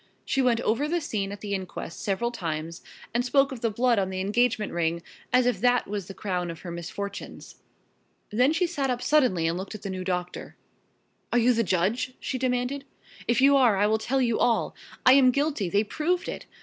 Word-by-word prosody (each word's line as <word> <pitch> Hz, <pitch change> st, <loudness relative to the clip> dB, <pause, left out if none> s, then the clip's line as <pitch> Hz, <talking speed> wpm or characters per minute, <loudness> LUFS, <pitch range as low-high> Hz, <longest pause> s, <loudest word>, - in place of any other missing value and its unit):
She 270 Hz, -, +1 dB
went 245 Hz, -3 st, +2 dB
over 245 Hz, +7 st, +1 dB
the 345 Hz, +3 st, 0 dB
scene 200 Hz, -10 st, -3 dB
at 205 Hz, -, -8 dB
the 205 Hz, -1 st, -4 dB
inquest 185 Hz, -3 st, -5 dB
several 215 Hz, +4 st, -1 dB
times, 165 Hz, -5 st, -4 dB, 0.3 s
and 240 Hz, +1 st, +1 dB
spoke 275 Hz, +2 st, +3 dB
of 255 Hz, -4 st, -7 dB
the 230 Hz, -, +1 dB
blood 235 Hz, +1 st, +2 dB
on 190 Hz, -1 st, 0 dB
the 190 Hz, 0 st, -4 dB
engagement 215 Hz, +2 st, +1 dB
ring, 170 Hz, 0 st, -1 dB, 0.3 s
as 250 Hz, 0 st, +4 dB
if 240 Hz, -6 st, 0 dB
that 245 Hz, 0 st, +3 dB
was 200 Hz, -3 st, -4 dB
the 195 Hz, -, -9 dB
crown 180 Hz, -3 st, -2 dB
of 165 Hz, -, -7 dB
her 175 Hz, -, -7 dB
misfortunes. 170 Hz, +4 st, -7 dB, 0.7 s
Then 250 Hz, +7 st, +3 dB
she 330 Hz, +3 st, +1 dB
sat 290 Hz, -6 st, -2 dB
up 250 Hz, -1 st, -2 dB
suddenly 255 Hz, -, +3 dB
and 170 Hz, +2 st, -1 dB
looked 195 Hz, +3 st, -6 dB
at 210 Hz, -, -10 dB
the 195 Hz, -, -4 dB
new 185 Hz, -1 st, -4 dB
doctor. 180 Hz, -1 st, -4 dB, 0.8 s
"Are -, -, +2 dB
you 245 Hz, +1 st, +4 dB
the 230 Hz, 0 st, +1 dB
judge?" 205 Hz, +7 st, 0 dB
she 260 Hz, -, -3 dB
demanded. 255 Hz, +2 st, -1 dB, 0.4 s
"If 240 Hz, +2 st, +2 dB
you 280 Hz, +1 st, +6 dB
are 245 Hz, -7 st, +4 dB
I 205 Hz, -, +3 dB
will 220 Hz, +1 st, +2 dB
tell 260 Hz, +4 st, 0 dB
you 235 Hz, -2 st, +1 dB
all. 240 Hz, -2 st, +1 dB, 0.3 s
I 255 Hz, -, +8 dB
am 265 Hz, -2 st, +6 dB
guilty 280 Hz, -, 0 dB
they 200 Hz, +4 st, +2 dB
proved 345 Hz, -, -1 dB
it! -, -, -6 dB
230 Hz, 215 wpm, -26 LUFS, 190-255 Hz, 0.8 s, I